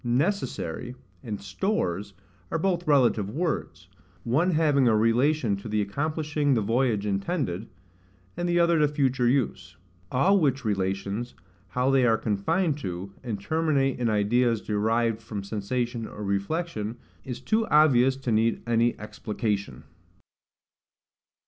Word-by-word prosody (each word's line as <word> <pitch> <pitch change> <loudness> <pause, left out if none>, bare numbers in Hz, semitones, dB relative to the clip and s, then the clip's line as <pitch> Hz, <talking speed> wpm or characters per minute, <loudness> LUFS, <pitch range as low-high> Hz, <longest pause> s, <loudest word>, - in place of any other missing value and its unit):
NECESSARY 125 - -1 0.3
and 105 -3 -5
STORES 100 - -2 0.3
are - - -1
both 175 0 -1
relative 120 -8 +3
words; 110 - -3 0.4
one 150 +10 +2
having 150 -6 +3
a 110 -2 +4
relation 115 +1 +2
to 100 +3 -8
the 105 0 0
accomplishing 145 +6 0
the 115 - +1
voyage 115 -1 +1
intended, 105 - -2 0.7
and 175 +1 -2
the 175 0 +3
other 170 -1 +4
to 150 - +4
future 135 -4 +1
use. 95 -9 -1 0.3
All 190 +10 +4
which 135 -5 0
relations, 100 +3 -2 0.3
how 125 +7 0
they 135 -1 +4
are 115 -2 +4
confined 145 - 0
to, 95 -2 -5
and 115 -5 -4
terminate 140 +2 0
in 120 -2 +1
ideas 115 +2 +2
derived 115 +2 0
from 105 -3 -6
sensation 115 +3 -3
or 105 - -8
reflection, 105 - -2 0.3
is 125 -2 -6
too 225 0 0
obvious 135 -4 +5
to 130 -3 -3
need 115 +1 +1
any 120 0 +2
explication. 105 - -3
120 Hz, 130 wpm, -26 LUFS, 105-145 Hz, 0.7 s, obvious